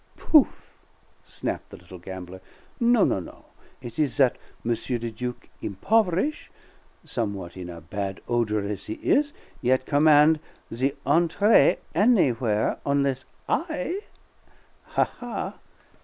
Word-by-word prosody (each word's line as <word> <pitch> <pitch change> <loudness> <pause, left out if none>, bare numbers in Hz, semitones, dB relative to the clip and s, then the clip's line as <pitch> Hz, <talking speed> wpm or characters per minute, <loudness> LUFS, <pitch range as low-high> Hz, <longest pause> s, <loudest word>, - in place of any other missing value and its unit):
Pouf!" - - +6 0.8
snapped - - -5
the - - -10
little 90 +1 -12
gambler. 95 0 -8 0.4
"No, 235 -2 +5
no, - - +1
no! 90 - -11 0.4
It 120 +2 -8
is 150 -3 +1
that 130 -3 +3 0.3
M. 120 - +1
le 120 0 -2
Duc, 125 +2 -6
impoverish', 195 - 0 0.6
somewhat 100 -7 -4
in 90 -1 -7
a 85 -1 -8
bad 95 +4 -4
odor 110 -4 0
as 100 -2 -5
he 110 - -3
is, 290 +1 +2 0.3
yet 130 +1 +2
command 150 +1 +5 0.3
the 130 +5 0
entree 170 - +4 0.2
any 200 - +4
where 110 -3 0
onless 140 -2 0 0.2
I 335 +3 -1 0.8
Ha, - - +2
ha! 245 -1 -6
125 Hz, 125 wpm, -25 LUFS, 100-170 Hz, 0.8 s, Pouf